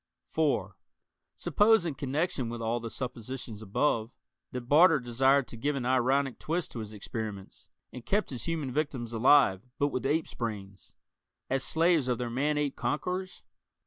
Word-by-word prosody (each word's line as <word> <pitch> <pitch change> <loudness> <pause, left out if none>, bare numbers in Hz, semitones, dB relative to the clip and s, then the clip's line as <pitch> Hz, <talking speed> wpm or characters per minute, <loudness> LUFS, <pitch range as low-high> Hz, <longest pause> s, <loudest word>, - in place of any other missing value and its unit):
(4) - - 0 0.6
Suppose, 215 -3 +3
in 165 - -1
connection 140 -1 -1
with 120 0 -5
all 115 +1 -1
the 115 0 -6
suppositions 120 -2 -6
above, 110 +2 0 0.4
that 125 - -4
Barter 150 +6 +5
desired 130 +2 +2
to - - -8
give 145 +5 -1
an 130 -3 -3
ironic 130 +1 +2
twist 170 +2 -2
to 120 - -6
his 110 -1 -6
experiments, 105 -1 -7 0.2
and 125 - -8
kept 205 - 0
his 125 - -5
human 160 -6 -2
victims 130 -5 -2
alive 115 -4 +5 0.2
but 145 - +2
with 130 -1 -2
apes' 155 +3 0
brains 100 -5 -6 0.6
as 135 0 +1
slaves 165 -4 +2
of 125 -2 +1
their 120 -1 -3
man 145 +5 0
ape 145 -2 -1
conquerors? 180 +5 -3
130 Hz, 160 wpm, -29 LUFS, 115-150 Hz, 0.6 s, Barter